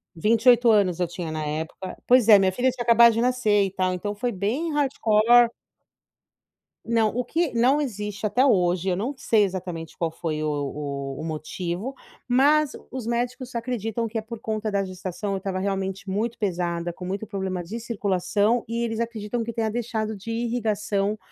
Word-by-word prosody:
28 230 Hz, +6 st, +4 dB
anos 190 Hz, -5 st, +3 dB
eu 180 Hz, -, +1 dB
tinha, 170 Hz, -1 st, -5 dB
na 155 Hz, 0 st, -3 dB
época. 160 Hz, +5 st, -5 dB
Pois 250 Hz, -2 st, +5 dB
é, 210 Hz, -, +10 dB
minha 190 Hz, -1 st, +3 dB
filha 250 Hz, +7 st, +1 dB
tinha 250 Hz, -1 st, -4 dB
acabado 235 Hz, 0 st, +7 dB
de 230 Hz, -, 0 dB
nascer, 240 Hz, -5 st, +2 dB
e 190 Hz, -, -4 dB
tal. 185 Hz, -1 st, 0 dB
Então, 205 Hz, +3 st, -3 dB
foi 240 Hz, +4 st, -2 dB
bem 235 Hz, -, -2 dB
hardcore. 240 Hz, -4 st, +4 dB, 1.4 s
Não, 225 Hz, -1 st, +2 dB
o 250 Hz, -, 0 dB
que 320 Hz, +4 st, -1 dB
não 250 Hz, +5 st, +3 dB
existe 210 Hz, -6 st, -4 dB
até 250 Hz, +6 st, +3 dB
hoje 180 Hz, -6 st, +2 dB
eu 180 Hz, -, 0 dB
não 245 Hz, +9 st, -3 dB
sei, 220 Hz, -4 st, +3 dB
exatamente, 180 Hz, -4 st, -6 dB
qual 165 Hz, -2 st, -1 dB
foi 160 Hz, -2 st, -3 dB
o 155 Hz, -, 0 dB
o 140 Hz, 0 st, -4 dB, 0.2 s
o -, -, -6 dB
motivo, 170 Hz, -, -4 dB, 0.3 s
mas, 285 Hz, +4 st, +3 dB, 0.2 s
os 255 Hz, -3 st, -5 dB
médicos 245 Hz, +2 st, -2 dB
acreditam 230 Hz, -1 st, -2 dB
que 225 Hz, +1 st, -5 dB
é -, -, -1 dB
por 225 Hz, +1 st, -8 dB
conta 215 Hz, -1 st, -3 dB
da 200 Hz, -1 st, +1 dB
gestação 185 Hz, +2 st, -5 dB
eu -, -, -1 dB
estava, 190 Hz, -1 st, -3 dB
realmente, 195 Hz, 0 st, -3 dB
muito 220 Hz, +5 st, -2 dB
pesada, 175 Hz, -4 st, -1 dB
com 180 Hz, +1 st, -9 dB
muito 195 Hz, +4 st, -4 dB
problema 190 Hz, -3 st, -3 dB
de 215 Hz, +8 st, -6 dB
circulação, 205 Hz, 0 st, 0 dB
e 230 Hz, +1 st, -2 dB
eles 225 Hz, -1 st, -2 dB
acreditam 230 Hz, 0 st, -3 dB
que 235 Hz, +1 st, -5 dB
tenha 225 Hz, -1 st, -1 dB
deixado 220 Hz, -1 st, -2 dB
de 200 Hz, +4 st, -7 dB
ir 230 Hz, +1 st, -1 dB
irrigação 210 Hz, -3 st, -1 dB
215 Hz, 185 wpm, -24 LUFS, 185-235 Hz, 1.4 s, é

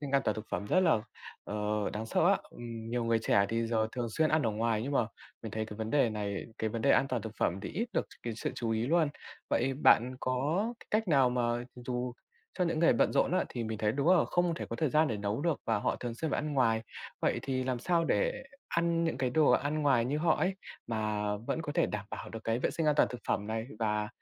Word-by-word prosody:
sinh 145 Hz, -2 st, -5 dB
an 140 Hz, 0 st, +3 dB
toàn 105 Hz, -, +1 dB
thực 110 Hz, 0 st, -7 dB
phẩm 100 Hz, -, -2 dB
rất 185 Hz, -, +3 dB
là, 165 Hz, -11 st, +4 dB, 0.9 s
đáng 110 Hz, +1 st, -4 dB
sợ -, -, +2 dB
á. -, -, +5 dB
Ừm, 115 Hz, -1 st, -7 dB
nhiều 120 Hz, -1 st, 0 dB
người 115 Hz, -1 st, +2 dB
trẻ 100 Hz, -2 st, +3 dB
thì 115 Hz, +1 st, 0 dB
giờ 110 Hz, -1 st, +1 dB
thường 120 Hz, -2 st, -2 dB
xuyên 155 Hz, +7 st, +2 dB
ăn 155 Hz, -1 st, +3 dB
ở 115 Hz, -, +1 dB
ngoài, 110 Hz, +1 st, 0 dB
nhưng 140 Hz, +4 st, -3 dB
mà 120 Hz, -5 st, +2 dB, 0.4 s
mình 110 Hz, -3 st, -6 dB
thấy 110 Hz, 0 st, -2 dB
cái 105 Hz, -, -8 dB
vấn 110 Hz, 0 st, -4 dB
đề 135 Hz, -5 st, +3 dB
này, 100 Hz, -2 st, -3 dB
cái 110 Hz, -, -1 dB
vấn 115 Hz, +1 st, -3 dB
đề 140 Hz, -, +4 dB
an 135 Hz, -, +4 dB
toàn 125 Hz, -5 st, -1 dB
thực 110 Hz, -, -6 dB
phẩm 90 Hz, +3 st, 0 dB
thì -, -, -5 dB
ít 230 Hz, +8 st, -3 dB
được -, -, 0 dB, 0.2 s
cái 120 Hz, -, -3 dB
sự -, -, -2 dB
chú 115 Hz, -2 st, -2 dB
ý 115 Hz, +2 st, 0 dB
luôn. 160 Hz, 0 st, +3 dB, 0.4 s
Vậy 135 Hz, +2 st, +1 dB
bạn 130 Hz, -2 st, +4 dB
có 145 Hz, -, 0 dB, 0.2 s
cách 215 Hz, -2 st, +1 dB
nào 135 Hz, -5 st, +4 dB
mà 125 Hz, 0 st, 0 dB, 0.3 s
dù 125 Hz, 0 st, -3 dB, 0.5 s
cho 180 Hz, -, +3 dB
những 165 Hz, -2 st, 0 dB
người 165 Hz, -, +5 dB
bận -, -, +2 dB
rộn -, -, +2 dB
á 185 Hz, -, +2 dB
thì 120 Hz, -2 st, -4 dB
mình 110 Hz, -1 st, -4 dB
thấy 105 Hz, -1 st, +1 dB
đúng 140 Hz, +6 st, 0 dB
là -, -, +4 dB
không 175 Hz, -1 st, +1 dB
thể -, -, -5 dB
có 115 Hz, -, -3 dB
thời 155 Hz, -, +1 dB
gian 155 Hz, 0 st, +4 dB
để 110 Hz, -, -1 dB
nấu 105 Hz, +4 st, -2 dB
được 165 Hz, -2 st, 0 dB
và 110 Hz, -2 st, +1 dB
họ -, -, 0 dB
thường 120 Hz, -2 st, -5 dB
xuyên 155 Hz, +5 st, -3 dB
phải -, -, 0 dB
ăn 150 Hz, 0 st, -3 dB
ngoài. 115 Hz, -5 st, +2 dB, 0.4 s
Vậy -, -, +1 dB
thì 130 Hz, -1 st, -1 dB
làm 125 Hz, -1 st, -1 dB
sao 170 Hz, +6 st, +1 dB
để 165 Hz, -, 0 dB, 0.3 s
ăn 170 Hz, 0 st, +1 dB
những 160 Hz, -5 st, -1 dB
cái 130 Hz, -2 st, 0 dB
đồ 155 Hz, +2 st, +4 dB
ăn 150 Hz, +2 st, +1 dB
ngoài 130 Hz, -5 st, +4 dB
như 145 Hz, +4 st, -1 dB
họ 160 Hz, 0 st, +3 dB
ấy, 190 Hz, +1 st, +1 dB, 0.3 s
mà 110 Hz, -2 st, -1 dB
vẫn 120 Hz, +9 st, -3 dB
có 145 Hz, -2 st, -4 dB
thể 170 Hz, 0 st, +2 dB
đảm 105 Hz, -1 st, -4 dB
bảo -, -, -6 dB
được 115 Hz, -1 st, -8 dB
cái 115 Hz, +1 st, +1 dB
vệ -, -, 0 dB
sinh 165 Hz, -2 st, -1 dB
an 150 Hz, -, +4 dB
toàn -, -, +5 dB
thực 125 Hz, -, -7 dB
phẩm 100 Hz, +1 st, 0 dB
này, 110 Hz, +1 st, -3 dB
và 105 Hz, -2 st, 0 dB
125 Hz, 265 wpm, -31 LUFS, 110-150 Hz, 0.9 s, á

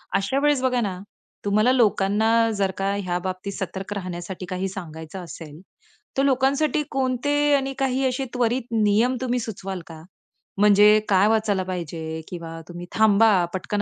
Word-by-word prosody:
अशा 195 Hz, +8 st, +1 dB
वेळेस 295 Hz, -3 st, +3 dB
बघा 250 Hz, -1 st, +1 dB
ना, 190 Hz, -4 st, -3 dB, 0.5 s
तुम्हाला 215 Hz, +5 st, +3 dB
लोकांना 215 Hz, -3 st, +2 dB, 0.3 s
जर 195 Hz, -1 st, +1 dB
का 195 Hz, +1 st, 0 dB
ह्या 185 Hz, -3 st, -2 dB
बाबतीत 185 Hz, +1 st, -4 dB
सतर्क 190 Hz, +1 st, -5 dB
राहण्यासाठी 185 Hz, -1 st, -6 dB
काही 185 Hz, +1 st, -2 dB
सांगायचं 170 Hz, -1 st, -8 dB
असेल. 155 Hz, -2 st, -10 dB, 0.6 s
तर 270 Hz, -, +3 dB
लोकांसाठी 275 Hz, +3 st, +2 dB
कोणते 265 Hz, +1 st, 0 dB, 0.2 s
आणि 270 Hz, -1 st, -1 dB
काही 265 Hz, 0 st, +1 dB
असे 260 Hz, +1 st, -2 dB
त्वरित 245 Hz, 0 st, 0 dB, 0.2 s
नियम 220 Hz, +5 st, +3 dB
तुम्ही 250 Hz, -1 st, 0 dB
सुचवाल 195 Hz, -5 st, -5 dB
का? 160 Hz, -1 st, -11 dB, 0.6 s
म्हणजे 210 Hz, +1 st, +6 dB
काय 195 Hz, +1 st, +4 dB
वाचायला 215 Hz, -3 st, +1 dB
पाहिजे 165 Hz, -3 st, -5 dB
किंवा 165 Hz, -2 st, -7 dB
तुम्ही 175 Hz, 0 st, -8 dB
थांबा 220 Hz, 0 st, +5 dB, 0.2 s
पटकन 195 Hz, +2 st, -2 dB
200 Hz, 150 wpm, -23 LUFS, 185-250 Hz, 0.6 s, म्हणजे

